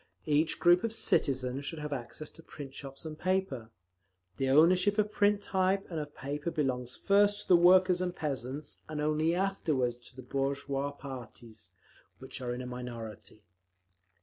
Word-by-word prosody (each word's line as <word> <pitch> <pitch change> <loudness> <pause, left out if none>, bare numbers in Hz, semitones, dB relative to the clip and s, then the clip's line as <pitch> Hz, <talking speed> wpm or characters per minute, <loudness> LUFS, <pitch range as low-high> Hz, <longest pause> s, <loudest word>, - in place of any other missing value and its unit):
Each 155 +1 +2
group 175 +1 +5
of 230 -1 -1
citizens 130 - 0
should 140 +4 -5
have 150 -1 -4
access 135 +4 -6
to - - -15
print 145 -4 -9
shops 135 +2 -6
and 155 -1 -7
paper…. 185 -12 -1 0.7
The 135 -1 0
ownership 180 +8 +5
of 210 0 +2
print 205 -1 +2
type 190 +1 +1
and 165 - -2
of 145 -1 -7
paper 145 +4 -3
belongs 125 -6 -2
first 205 +1 +3
to - - -14
the 180 - +8
workers 180 +1 +6
and 180 -1 -2
peasants, 140 -1 -4
and 155 -1 -4
only 155 +2 +1
afterwards 155 -10 0
to - - -24
the 130 - -9
bourgeois 140 +2 -1
parties, 120 -8 -10 0.5
which 130 0 -9
are 125 -1 -2
in 125 +1 -4
a - - -6
minority…. 115 -4 -8
145 Hz, 165 wpm, -31 LUFS, 130-180 Hz, 0.7 s, the